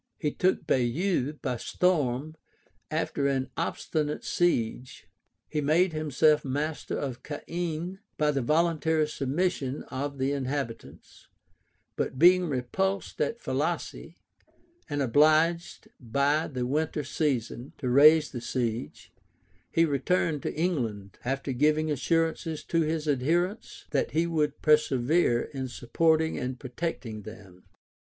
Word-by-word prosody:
{1105.} 150 -3 0
He - - -19
took 185 +1 +1
Baieux 135 +4 +1
by 125 -3 -1
storm, 155 -1 0 0.5
after 155 -2 -1
an 135 -1 -1
obstinate 150 -1 -2
siege; 130 -7 -1 0.4
he 150 - -2
made 165 +5 +3
himself 155 0 +2
master 145 +3 -3
of 130 -3 -4
Caen, 170 +4 -4 0.2
by 150 -1 +2
the 140 -2 -1
voluntary 160 +2 +2
submission 140 -1 -1
of 140 +1 -4
the 135 +1 0
inhabitants; 135 -4 -5 0.7
but - - -2
being 180 +3 +6
repulsed 190 +10 -2
at 470 0 -1
Falaise, - - -3 0.7
and 145 -1 0
obliged, 155 +6 +3
by 140 +6 +1
the 125 -4 -3
winter 150 +3 -1
season, 135 -4 -2
to 130 - -4
raise 150 +4 +6
the 120 - -5
siege, 120 -2 -3 0.6
he 165 - +4
returned 150 +1 0
into - - -4
England; 115 - -2
after 135 +2 -2
giving 155 +4 +2
assurances 165 +1 0
to 165 - 0
his 155 0 -1
adherents, 170 - -1
that 140 - 0
he 165 +2 +2
would 150 -3 -1
persevere 150 -3 +3
in 130 -2 -5
supporting 160 +7 +1
and 125 0 -4
protecting 125 -5 -4
them. 100 -4 -12
150 Hz, 120 wpm, -28 LUFS, 130-160 Hz, 0.7 s, being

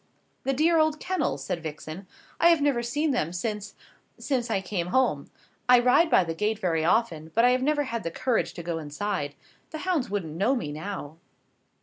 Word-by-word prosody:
"The 270 - +1
dear 320 +4 +3
old 310 -1 +2
kennels!" 350 - -1
said 170 +4 -3
Vixen, 155 +4 -7 0.3
"I 340 - +6
have 335 -2 +5
never 285 -4 +2
seen 290 +6 0
them 170 - 0
since 210 +2 -4 0.4
since 250 -4 -1
I 210 - +1
came 185 -2 -3
home. 180 - +1 0.4
I 250 -1 +8
ride 250 +7 +4
by 190 - +5
the 165 -1 -3
gate 210 +6 -1
very 170 -6 0
often, 165 -4 +1
but 230 +2 +5
I 250 - +6
have 255 0 +2
never 295 +2 +2
had 235 -4 -3
the 165 - -3
courage 240 +7 -1
to 170 - -6
go 165 -1 -3
inside. 150 0 -3 0.3
The 315 - -6
hounds 345 -9 0
wouldn't 190 -6 -3
know 210 +10 +2
me 155 - -3
now." 155 -1 -6
210 Hz, 200 wpm, -27 LUFS, 165-260 Hz, 0.4 s, I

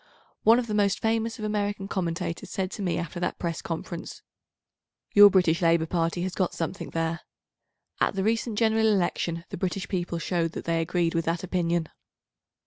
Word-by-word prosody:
One 225 +2 +6
of 245 - 0
the 215 - -4
most 200 -2 +2
famous 225 0 0
of 215 - -4
American 205 -2 -2
commentators 170 -3 -3
said 190 -1 -2
to - - -6
me 180 -3 0
after 170 0 -4
that 175 - -2
Press 170 -2 -3
conference, 165 0 -6 0.9
"Your 205 0 +10
British 180 -3 +3
Labour 165 -1 +3
Party 165 +1 -1
has 185 0 -3
got 185 -2 -1
something 170 +4 -4
there." 165 +1 -1 0.8
At - - +1
the 190 - 0
recent 225 0 0
General 220 0 +3
Election 175 -4 0
the - - -5
British 185 +1 -2
people 175 -2 -2
showed 165 -1 -1
that - - -6
they 165 -1 +1
agreed 170 0 0
with 165 0 0
that 165 +1 -1
opinion. 170 -2 0
180 Hz, 180 wpm, -27 LUFS, 170-205 Hz, 0.9 s, Your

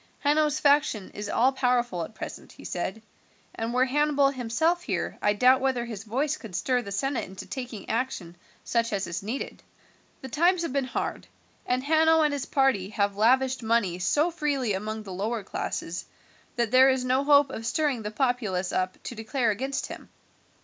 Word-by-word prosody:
"Hanno's 300 +1 +2
faction 285 -9 +2
is 205 0 -6
all 255 +3 +3
powerful 245 -8 0
at 220 - -9
present," - - -8
he - - -14
said, 190 +5 -4 0.5
"and 225 +1 -3
were 250 +1 +3
Hannibal 285 0 +2
himself 280 +8 0
here - - -3
I 205 - +3
doubt 255 +5 +5
whether 260 -3 0
his 220 -3 -7
voice 275 +7 -1
could 210 -7 -9
stir 250 +4 +1
the 200 -4 -8
senate 265 +6 -1
into 190 0 -9
taking 250 -6 -6
action 225 -8 -2 0.3
such 230 -1 0
as 195 -1 -1
is 170 +1 -4
needed. 225 +7 -5 0.6
The - - -5
times 340 +6 +2
have 330 - -3
been 275 -2 +1
hard, 255 - -4 0.4
and 250 +1 0
Hanno 320 +2 +4
and 300 -1 +2
his 280 -2 -3
party 265 -9 +2
have 200 -2 0
lavished 260 +5 +3
money 220 -6 +1
so 295 - +2
freely 285 -9 -1
among 215 +3 -4
the 195 -3 -8
lower 215 +4 -2
classes 170 -2 -4 0.5
that 235 -3 0
there 260 +1 +7
is 260 -1 +1
no 260 +2 +2
hope 285 -1 +5
of 225 - -6
stirring 275 0 0
the 210 - -4
populace 215 -6 -1
up 185 0 -1
to - - -5
declare 230 +1 0
against 265 +6 -2
him. - - -9
250 Hz, 185 wpm, -27 LUFS, 210-275 Hz, 0.6 s, there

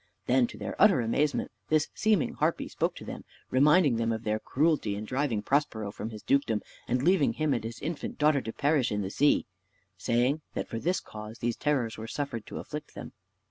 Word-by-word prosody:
Then, 125 -1 +3
to - - -11
their - - -5
utter 200 -8 +7
amazement, 140 +6 0 0.2
this 155 -1 +2
seeming 215 -6 +2
harpy - - 0
spoke - - -1
to - - -9
them, - - -7 0.3
reminding 145 0 +5
them 115 0 0
of 110 0 -3
their 110 -1 0
cruelty 145 -8 +1
in 105 +2 -5
driving 125 -3 -1
Prospero 115 -6 0
from 105 +2 -5
his 110 -2 -9
dukedom, 130 -6 +1 0.2
and 125 +2 0
leaving 160 -8 +4
him 155 +3 +1
and 120 -3 -1
his 115 +1 -6
infant 160 +1 -4
daughter 150 -2 +3
to 115 - -5
perish 140 -2 +1
in 105 -1 -1
the 95 - -4
sea; 145 +6 +3 0.5
saying, 120 +9 +1
that - - -2
for 115 - -4
this 180 +8 0
cause 110 +1 -9
these 120 0 -1
terrors 125 -7 0
were 110 - -6
suffered 120 -4 -4
to - - -7
afflict 150 0 -7
them. - - -8
125 Hz, 205 wpm, -29 LUFS, 115-150 Hz, 0.5 s, utter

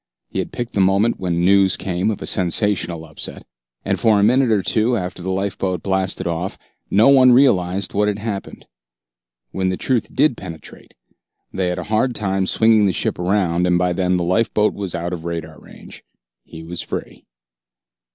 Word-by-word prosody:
He - - -4
had - - -3
picked 120 -1 -5
the 100 - +1
moment 100 +5 +2
when 85 -2 -1
news 95 0 +4
came 90 +1 -1
of 105 - -4
a - - -5
sensational 90 -3 -1
upset, 80 -2 -7 0.4
and - - -1
for 110 -3 +3
a - - +3
minute 125 +4 +3
or 105 -4 +2
two 115 +5 +1
after 90 -2 -5
the 95 - -4
lifeboat 95 -2 -2
blasted 95 -1 -1
off, 85 +2 -3 0.3
no 110 +7 +5
one 130 -2 +6
realized 100 -8 +2
what 105 +1 +1
had 105 -1 -1
happened. 105 -2 -6 0.9
When 95 -1 -1
the 95 - -2
truth 115 -5 -1
did 145 -2 +3
penetrate, 85 -6 -11 0.6
they 95 -1 -1
had 90 - -2
a - - -4
hard 110 +4 0
time 95 -2 -1
swinging 110 -1 +4
the 95 - 0
ship - - -2
around, 90 -2 +1
and 90 0 +3
by 90 0 +1
then 90 0 0
the 90 - -1
lifeboat 105 +3 +1
was 100 -3 -5
out 85 +1 -3
of 85 -2 -6
radar 85 -2 -6
range. - - -14 0.4
He 80 0 -11
was 85 +1 -4
free. - - -7
95 Hz, 185 wpm, -20 LUFS, 90-105 Hz, 0.9 s, one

